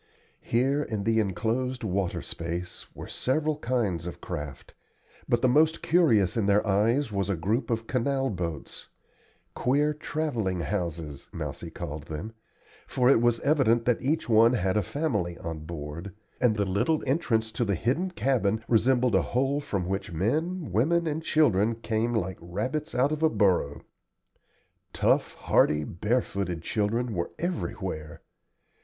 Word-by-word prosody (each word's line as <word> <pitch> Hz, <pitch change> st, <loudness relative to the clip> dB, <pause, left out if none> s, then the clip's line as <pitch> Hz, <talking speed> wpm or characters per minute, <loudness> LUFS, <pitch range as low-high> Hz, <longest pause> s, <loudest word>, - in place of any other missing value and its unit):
Here 135 Hz, +5 st, +1 dB
in 110 Hz, -8 st, -3 dB
the 115 Hz, +1 st, +2 dB
enclosed 115 Hz, +5 st, -1 dB
water 95 Hz, -3 st, -1 dB
space 85 Hz, +2 st, -5 dB
were -, -, -7 dB
several 150 Hz, +3 st, 0 dB
kinds 110 Hz, -, -1 dB
of 90 Hz, -, -7 dB
craft, 75 Hz, -1 st, -7 dB, 0.6 s
but 120 Hz, +1 st, +2 dB
the -, -, +6 dB
most 155 Hz, +5 st, +3 dB
curious 115 Hz, -, +3 dB
in 110 Hz, -4 st, +1 dB
their 105 Hz, +2 st, +3 dB
eyes 115 Hz, +6 st, +2 dB
was 100 Hz, -1 st, -1 dB
a 100 Hz, -, +1 dB
group 105 Hz, -, -1 dB
of 115 Hz, -1 st, -1 dB
canal 135 Hz, +2 st, 0 dB
boats 85 Hz, -5 st, -5 dB, 0.6 s
"queer 145 Hz, +4 st, +2 dB
travelling 130 Hz, -, -2 dB
houses" 85 Hz, -4 st, -4 dB
Mousie -, -, -5 dB
called 75 Hz, 0 st, -7 dB
them; 90 Hz, +9 st, -6 dB, 0.5 s
for 125 Hz, 0 st, +3 dB
it 115 Hz, -, +4 dB
was 120 Hz, -1 st, +2 dB
evident 130 Hz, -6 st, +3 dB
that 125 Hz, -2 st, +2 dB
each 150 Hz, +5 st, 0 dB
one 115 Hz, +1 st, +5 dB
had 95 Hz, -5 st, +1 dB
a 105 Hz, -, +3 dB
family 95 Hz, -, -2 dB
on 80 Hz, -2 st, -6 dB
board, 85 Hz, +4 st, -7 dB, 0.2 s
and 120 Hz, -4 st, +3 dB
the 100 Hz, -1 st, 0 dB
little 100 Hz, -, +1 dB
entrance 120 Hz, -6 st, +1 dB
to 120 Hz, -, -1 dB
the 100 Hz, -4 st, +1 dB
hidden 135 Hz, -, 0 dB
cabin 115 Hz, -, 0 dB
resembled 125 Hz, +1 st, +3 dB
a -, -, +5 dB
hole 135 Hz, +3 st, 0 dB
from 100 Hz, -11 st, -2 dB
which 95 Hz, +1 st, -3 dB
men, 150 Hz, -, -1 dB
women, 165 Hz, -, +2 dB
and 155 Hz, 0 st, -1 dB
children 115 Hz, -9 st, +3 dB
came 115 Hz, +1 st, -1 dB
like 95 Hz, -4 st, -2 dB
rabbits 125 Hz, -, -3 dB
out 135 Hz, +4 st, +3 dB
of 155 Hz, 0 st, -2 dB
a 160 Hz, -, +5 dB
burrow. 95 Hz, -, +1 dB, 1.1 s
Tough, -, -, +2 dB
hardy, 75 Hz, 0 st, +2 dB
barefooted 95 Hz, -, -2 dB
children 110 Hz, +5 st, -1 dB
were 85 Hz, -3 st, -2 dB
everywhere. 95 Hz, -, -4 dB
110 Hz, 150 wpm, -27 LUFS, 95-135 Hz, 1.1 s, the